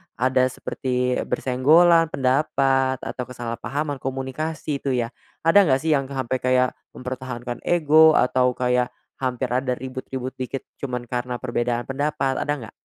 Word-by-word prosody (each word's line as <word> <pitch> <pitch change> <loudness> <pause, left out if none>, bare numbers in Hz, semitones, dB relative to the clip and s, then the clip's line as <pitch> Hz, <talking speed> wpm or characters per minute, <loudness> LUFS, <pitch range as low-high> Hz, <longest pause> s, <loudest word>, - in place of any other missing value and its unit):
ada 130 +1 +2
seperti 125 -1 -2
bersenggolan 165 +6 +4
pendapat 135 -1 +1
atau 125 - -4
kesalahpahaman 125 +4 -4
komunikasi 135 +3 -3
itu 135 -2 -1
ya. 120 -1 -1 0.3
Ada 165 +5 +6
nggak 130 -2 +3
sih 160 - +1
yang 135 -1 -1
sampai 130 -2 -2
kayak 130 0 +3 0.3
mempertahankan 125 -1 -5
ego 160 -1 +6
atau 125 0 +3
kayak 125 0 +1 0.3
hampir 130 -1 -1
ada 125 +1 0
ribut-ribut 130 0 -5
dikit 130 +1 -4 0.2
cuman 125 -3 -3
karena 125 +1 -3
perbedaan 120 -1 -1
pendapat, 135 -1 -1
ada 145 - 0
nggak? - - -14
130 Hz, 135 wpm, -23 LUFS, 125-140 Hz, 0.3 s, Ada